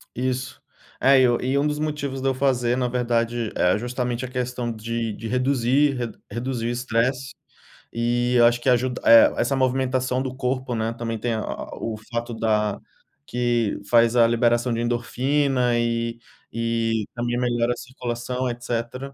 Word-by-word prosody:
Isso. 130 Hz, +1 st, -3 dB, 0.4 s
É 135 Hz, 0 st, +5 dB
e -, -, +5 dB, 0.3 s
e -, -, +2 dB
um 145 Hz, +2 st, +2 dB
dos 150 Hz, 0 st, -2 dB
motivos 150 Hz, -3 st, -3 dB
de 135 Hz, -, 0 dB
eu 135 Hz, -, +2 dB
fazer 125 Hz, -3 st, +1 dB
na 125 Hz, -1 st, 0 dB
verdade, 120 Hz, -2 st, -1 dB
é 90 Hz, +2 st, +3 dB
justamente 125 Hz, +1 st, -3 dB
a -, -, -5 dB
questão 125 Hz, -1 st, -3 dB
de 115 Hz, 0 st, -3 dB
de 115 Hz, -, -7 dB
reduzir 130 Hz, +3 st, +2 dB, 0.4 s
reduzir 120 Hz, -1 st, -3 dB
o -, -, -1 dB
estresse, 125 Hz, +2 st, -1 dB, 0.6 s
e 120 Hz, +1 st, 0 dB
eu 120 Hz, -, +7 dB
acho 120 Hz, 0 st, +3 dB
que 130 Hz, -, +1 dB
ajuda 125 Hz, +1 st, +1 dB
eh, 115 Hz, 0 st, +8 dB
essa 120 Hz, +3 st, +1 dB
movimentação 130 Hz, 0 st, 0 dB
do 130 Hz, -1 st, -4 dB
corpo, 130 Hz, -1 st, -2 dB
né, 115 Hz, 0 st, -1 dB
também 115 Hz, -1 st, -4 dB
tem 120 Hz, +1 st, -1 dB
a 110 Hz, -, -2 dB, 0.4 s
o 110 Hz, -1 st, -4 dB
fato 120 Hz, 0 st, -3 dB
da 105 Hz, -2 st, 0 dB, 0.5 s
que 120 Hz, -1 st, 0 dB
faz 115 Hz, 0 st, +4 dB
a 120 Hz, -1 st, +6 dB
liberação 120 Hz, +1 st, +2 dB
de 115 Hz, -, -2 dB
endorfina 125 Hz, +1 st, +1 dB
e 115 Hz, 0 st, -1 dB, 0.4 s
e 115 Hz, -1 st, 0 dB
também 120 Hz, 0 st, -1 dB
melhora 120 Hz, -1 st, +1 dB
a -, -, -10 dB
circulação 125 Hz, 0 st, -4 dB
etcétera. 120 Hz, +3 st, -4 dB
120 Hz, 165 wpm, -23 LUFS, 115-130 Hz, 0.6 s, eh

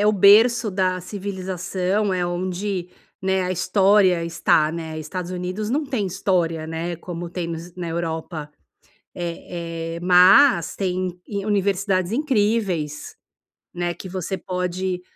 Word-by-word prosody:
é 205 Hz, -, +3 dB
o 210 Hz, -, +6 dB
berço 215 Hz, +4 st, +6 dB
da 185 Hz, -1 st, 0 dB
civilização, 190 Hz, +1 st, -2 dB
é 180 Hz, -1 st, 0 dB
onde, 180 Hz, +1 st, -3 dB, 0.3 s
né, 190 Hz, 0 st, +1 dB
a 180 Hz, -, -1 dB
história 190 Hz, -1 st, +3 dB
está, 160 Hz, -2 st, +2 dB
né. 160 Hz, -1 st, -5 dB
Estados 175 Hz, +3 st, -5 dB
Unidos 185 Hz, +4 st, -3 dB
não 295 Hz, +4 st, 0 dB
tem 255 Hz, -7 st, -2 dB
história, 170 Hz, -4 st, 0 dB
né. 165 Hz, +1 st, -4 dB
Como 170 Hz, 0 st, -7 dB
tem 175 Hz, -1 st, -3 dB
nos 170 Hz, +1 st, -7 dB
na 175 Hz, -2 st, -4 dB
Europa 160 Hz, -2 st, -4 dB, 0.6 s
eh 165 Hz, -1 st, -5 dB
eh, -, -, -7 dB
mas 180 Hz, -, +6 dB
tem, 185 Hz, -2 st, -2 dB
i 200 Hz, 0 st, -4 dB
universidades 195 Hz, -1 st, +1 dB
incríveis. 210 Hz, -, 0 dB, 0.6 s
Né, 175 Hz, 0 st, -2 dB
que -, -, -9 dB
você 185 Hz, +1 st, -4 dB
pode, 180 Hz, 0 st, -3 dB
180 Hz, 135 wpm, -22 LUFS, 170-200 Hz, 0.6 s, o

